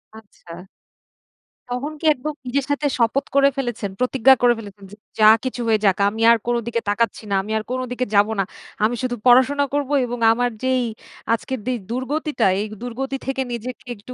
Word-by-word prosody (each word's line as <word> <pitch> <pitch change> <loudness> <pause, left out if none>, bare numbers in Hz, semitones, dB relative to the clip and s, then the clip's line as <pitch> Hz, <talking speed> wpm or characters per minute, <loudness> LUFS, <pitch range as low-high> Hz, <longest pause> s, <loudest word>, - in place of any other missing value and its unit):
আচ্ছা। 180 -4 -13 1.0
তখন 255 +5 -3
কি - - -7
একদম 300 +4 -5
নিজের 270 +2 0
সাথে 290 +1 -1
শপথ 235 +4 +1
করে 280 0 +6
ফেলেছেন, 240 -6 -3
প্রতিজ্ঞা 260 +1 +5
করে 240 -1 +5
ফেলেছেন? 200 -2 -11
যে, - - -10 0.2
যা 215 - +6 0.2
কিছু 255 -1 -3
হয়ে 220 -1 +3
যাক 190 -2 +3
আমি 220 +2 -6
আর 235 - +5
কোনো 240 0 +1
দিকে 230 -1 -1
তাকাচ্ছি 220 +1 0
না, - - +2
আমি 210 +3 -8
আর 215 - -3
কোনো 255 0 -1
দিকে 250 0 -1
যাবো 205 +2 +4
না। - - +3 0.4
আমি 235 +3 +2
শুধু 245 -1 -1
পড়াশোনা 260 +3 +5
করবো 290 0 -1
এবং 245 0 -5
আমার 245 +1 +1
যেই 260 -1 +1 0.5
আজকের 260 +2 -3
যে, 255 - +1 0.2
দূর্গতিটা 290 +5 -1
এই 210 - -1 0.2
দূর্গতি 265 +3 -4
থেকে 270 0 -1
নিজেকে 250 +2 -7
একটু 210 +5 -11
245 Hz, 185 wpm, -21 LUFS, 220-265 Hz, 1.0 s, করে